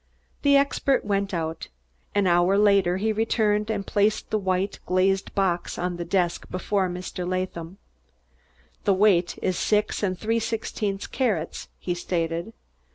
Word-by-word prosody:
The 280 -1 +5
expert 275 -2 +1
went 200 -1 0
out. 165 -2 -3 0.5
An 205 -1 +3
hour 175 +2 +4
later 200 -3 +4
he 220 +3 0
returned 215 -1 +1
and 205 -3 -2
placed 210 +1 +1
the 215 - +2
white, 190 0 -1
glazed 190 +1 +1
box 180 -3 0
on 180 0 -2
the 175 - -3
desk 175 -1 0
before 190 +1 0
Mr. 180 0 -5
Latham. 185 -1 -3 1.1
"The 200 -3 +4
weight 185 -3 +3
is 185 -2 0
six 210 0 +1
and 185 -3 0
three 225 +3 0
sixteenths 215 -3 -3
carats," 205 - -2
he 180 - -2
stated. 170 +2 -2
195 Hz, 145 wpm, -25 LUFS, 180-210 Hz, 1.1 s, The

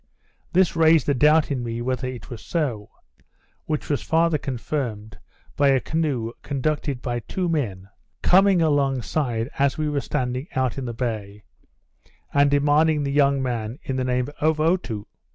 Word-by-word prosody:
This 185 -1 +3
raised 160 -2 +4
a - - +4
doubt 150 +3 +4
in 130 -3 -1
me 115 0 -4
whether 130 +1 -2
it 130 +1 -8
was 120 - -7
so; 125 -11 -2 0.8
which 155 -2 -2
was 145 - 0
farther 165 -1 +2
confirmed, 120 -5 -4 0.4
by 145 - +3
a 135 -1 +4
canoe, 140 -7 -1
conducted 140 -1 -2
by 120 -1 -2
two 180 +9 -3
men, 110 - -2 0.4
coming 190 -1 +5
along 140 -5 +1
side, 120 -6 -1
as 140 0 +2
we 155 -1 -1
were 145 -1 -1
standing 125 +3 -2
out 130 0 0
of 130 - -4
the 120 - -4
bay, 105 -4 -4 0.9
and 140 0 +4
demanding 145 +2 +3
the 140 - -2
young 140 -1 +3
man 120 -2 -3
in 135 - -3
the 130 - -1
name 125 0 0
of 155 0 +2
Otoo. 155 - 0
140 Hz, 165 wpm, -23 LUFS, 120-155 Hz, 0.9 s, coming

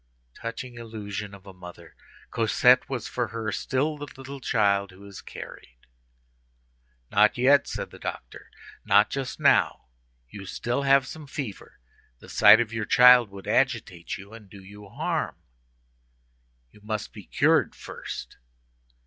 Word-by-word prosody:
Touching 120 +1 -7
illusion 105 -3 -6
of 100 0 -17
a 95 - -11
mother! 90 -2 -13 0.4
Cosette 125 +3 +3
was, 125 -4 -4
for 120 -2 -2
her, 110 0 -4
still 145 +8 -1
the 145 - -6
little 135 +1 -8
child 100 -5 +1
who 95 +2 -15
is 100 -1 -10
carried. - - -11 1.3
"Not 105 +3 +4
yet," 135 +3 +4
said - - -5
the - - -13
doctor, - - -7 0.3
"not 105 +2 +4
just 135 -2 -4
now. - - +2 0.4
You 95 +8 -10
still 120 +7 -2
have 135 -1 +4
some 150 +2 -9
fever. 135 -7 -7 0.4
The - - -16
sight 105 +1 +7
of 115 -1 -2
your 110 -1 -2
child 125 -2 +7
would 100 0 -11
agitate 115 -10 -1
you 100 +3 -13
and 110 -3 -13
do 100 0 -13
you 100 +1 -13
harm. - - -2 1.4
You 105 - -20
must 105 0 -5
be - - -12
cured - - +2
first." - - -8
110 Hz, 145 wpm, -26 LUFS, 100-125 Hz, 1.4 s, sight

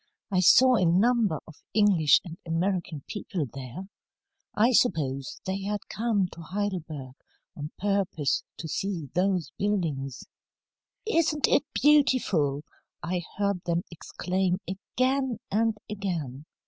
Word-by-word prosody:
I 185 - +2
saw 255 +7 +6
a 185 - +2
number 205 -1 +3
of 155 - -14
English 195 -8 +5
and 165 -2 -7
American 170 -3 -1
people 190 -6 -3
there. 135 - -8 0.7
I 230 +4 +4
suppose 145 - +1
they 190 +1 -2
had 205 +1 -3
come 215 -4 +1
to 170 - -11
Heidelberg 165 -8 -4 0.4
on 150 0 -5
purpose 195 -7 0 0.2
to 165 - -6
see 165 -4 -3
those 180 -6 +1
buildings. 155 -11 -1 0.8
"'Isn't 325 -8 +2
it 285 - +3
beautiful!' 220 - +3 0.4
I 175 +1 -1 0.2
heard 200 -3 0
them 170 0 +1
exclaim 180 +2 -1
again 255 +6 -1
and 225 +1 +1
again. 165 -9 -4
185 Hz, 120 wpm, -27 LUFS, 160-210 Hz, 0.8 s, saw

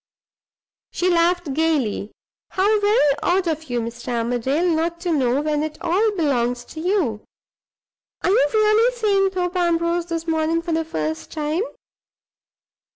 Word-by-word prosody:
She 360 +1 0
laughed 345 -3 +1
gayly. 280 -10 0 0.4
"How 415 +3 +2
very 410 - +3
odd 365 0 +1
of 315 -1 -2
you, 245 -1 0
Mr. 235 +1 -7
Armadale, 245 +8 0
not 335 0 0
to 350 -1 -1
know, 265 -3 +1
when 300 -1 0
it 310 0 -4
all 400 +6 +2
belongs 245 -7 0
to 315 - -7
you! 320 - 0 1.0
Are - - +2
you 290 -8 +4
really 435 +3 +3
seeing 400 -4 +2
Thorpe 365 -1 -3
Ambrose 340 0 +1
this 330 -1 -3
morning 325 0 0
for 340 - -4
the 325 0 +1
first 160 - -4
time? 310 +3 -1
330 Hz, 145 wpm, -22 LUFS, 285-360 Hz, 1.0 s, you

